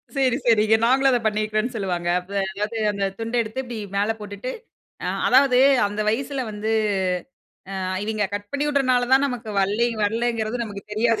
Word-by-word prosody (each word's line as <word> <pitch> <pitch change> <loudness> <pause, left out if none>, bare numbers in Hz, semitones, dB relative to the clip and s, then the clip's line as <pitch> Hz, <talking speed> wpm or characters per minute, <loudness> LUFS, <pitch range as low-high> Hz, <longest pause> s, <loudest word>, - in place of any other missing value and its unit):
செரி 260 -2 +2
,செரிங்க. 220 -2 +4
நாங்களும் 270 +2 +4
அத 245 - +3
பண்ணியிருக்குறோன்னு 215 +3 -1
சொல்வாங்க. 180 -5 -2
அப்ப 180 +2 -14 0.2
அதாவது 210 +3 -3
அந்த 200 -1 -3 0.2
துண்ட 225 +1 -4
எடுத்து 220 +4 -4
இப்பிடி 240 -2 -7 0.2
மேல 205 +2 +2
போட்டுட்டு 210 +4 -6 0.5
அ - - -1 0.2
அதாவது 260 -1 +5 0.3
அந்த 205 +1 -4
வயசில 270 +4 -1
வந்து 210 +1 -4 1.1
அ - - -3 0.2
இவய்ங்க 215 -1 -1
கட் 205 0 -5
பண்ணி 285 +1 0
விடுறதுனால 255 -4 +2
தான் 270 +1 +6
நமக்கு 245 -4 -5
வல்லே 210 +5 +1 0.2
வரலேங்கிறது 230 +1 -1
நமக்கு 200 -2 -8
தெரியாது. 230 +1 +2
225 Hz, 160 wpm, -23 LUFS, 210-250 Hz, 1.1 s, தான்